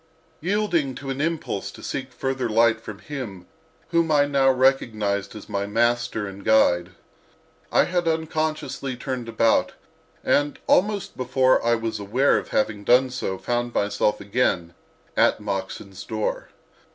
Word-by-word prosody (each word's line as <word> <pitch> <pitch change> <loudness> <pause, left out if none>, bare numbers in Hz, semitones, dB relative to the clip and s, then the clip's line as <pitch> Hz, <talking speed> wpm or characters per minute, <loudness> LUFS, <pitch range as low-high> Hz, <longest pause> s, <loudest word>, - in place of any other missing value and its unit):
Yielding 175 -7 0
to 135 -1 -5
an 135 +1 -3
impulse 155 -11 -2
to - - -12
seek 130 -1 -4
further 130 -1 -2
light 110 0 +3
from 110 -3 -8
him 110 -9 -7 0.4
whom 170 -1 +2
I 145 -1 +5
now 140 -2 +3
recognized 115 -7 +1
as 105 - -9
my 100 -1 -2
master 115 0 +1
and 100 0 -8
guide, 90 -5 +3 0.8
I - - +5
had 175 -1 -1
unconsciously 155 -4 -2
turned 125 -2 -4
about, 115 0 +2 0.5
and 145 0 +2
almost 205 0 +2
before 130 0 +2
I 120 0 +3
was 115 -1 -3
aware 120 +8 +2
of - - -9
having 105 -1 0
done 125 +3 +4
so 110 -7 -3
found 120 +2 -2
myself 105 +1 +1
again 100 -5 0 0.4
at - - +3
Moxon's 100 -1 -5
door. 110 -2 -3
120 Hz, 140 wpm, -24 LUFS, 105-140 Hz, 0.8 s, I